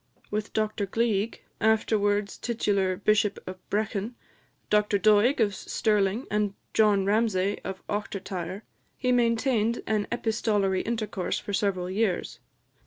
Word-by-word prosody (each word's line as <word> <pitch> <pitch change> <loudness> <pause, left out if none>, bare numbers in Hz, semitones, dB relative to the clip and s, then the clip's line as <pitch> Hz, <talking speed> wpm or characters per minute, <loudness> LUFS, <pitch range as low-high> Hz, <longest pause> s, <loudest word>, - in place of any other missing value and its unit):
With 210 0 -3
Dr 215 -2 -1
Gleig, 225 0 0 0.2
afterwards 210 -2 +2
titular 200 -5 0
Bishop 210 +1 +2
of 185 0 -7
Brechin, 215 +2 -2 0.6
Dr 210 -1 +3
Doig 215 +6 +4
of 210 -3 +2
Stirling, 210 +3 0
and 210 -1 0 0.2
John 205 -3 +4
Ramsay 205 -2 +1
of 190 -1 -6
Ochtertyre, 195 -2 -4 0.3
he 250 -1 0
maintained 235 -1 +2
an 215 -2 0
epistolary 215 -5 0
intercourse 215 -5 -2
for 205 - -6
several 195 -3 0
years. 195 -1 -1
210 Hz, 115 wpm, -27 LUFS, 195-220 Hz, 0.6 s, Doig